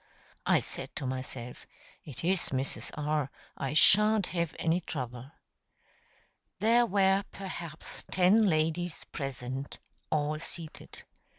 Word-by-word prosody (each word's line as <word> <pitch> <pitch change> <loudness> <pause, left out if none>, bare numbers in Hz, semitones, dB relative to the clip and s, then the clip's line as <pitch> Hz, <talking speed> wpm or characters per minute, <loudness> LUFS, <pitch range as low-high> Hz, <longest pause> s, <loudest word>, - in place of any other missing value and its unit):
I - - +5
said - - -3
to - - -3
myself: 130 -1 -5 0.4
"It 140 -2 -7
is 180 +1 +2
Mrs. 135 +1 -2
R.; 150 -2 0 0.3
I 135 +1 -3
shan't 210 +4 +6
have 170 -2 -1
any 165 +2 +1
trouble." 125 -4 -5 1.3
There 235 +2 +4
were 195 -1 +3
perhaps 170 -5 -7
ten 195 +4 +5
ladies 165 +1 0
present, 135 -1 -4 0.3
all 155 0 0
seated. 165 -1 -7
160 Hz, 110 wpm, -30 LUFS, 135-190 Hz, 1.3 s, shan't